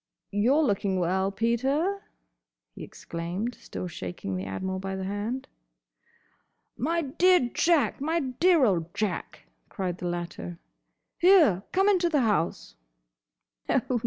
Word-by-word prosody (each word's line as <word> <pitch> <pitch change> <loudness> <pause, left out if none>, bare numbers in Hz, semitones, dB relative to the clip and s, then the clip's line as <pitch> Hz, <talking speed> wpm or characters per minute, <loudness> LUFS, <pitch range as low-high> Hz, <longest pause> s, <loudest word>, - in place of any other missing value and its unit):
"You're 245 +10 +3
looking 200 -6 0
well, 190 +2 +1
Peter!" 270 - 0 0.7
he - - -11
exclaimed, 175 +8 -5
still 180 - -7
shaking 95 - -5
the 95 +1 -4
Admiral 190 - -3
by 190 0 -4
the 190 - -4
hand. 205 +7 -3 1.3
"My 330 +6 0
dear 310 -2 +3
Jack! 300 -9 +2
My 325 +4 +1
dear 300 +3 +3
old 170 -5 0
Jack!" 205 -5 -3 0.3
cried 180 -2 -4
the 180 - -3
latter. 175 0 -5 0.6
"Here! 345 - +6
come 385 +2 +2
into 370 -4 +3
the 300 -4 +2
house!" 170 - 0
215 Hz, 120 wpm, -27 LUFS, 185-305 Hz, 1.3 s, Here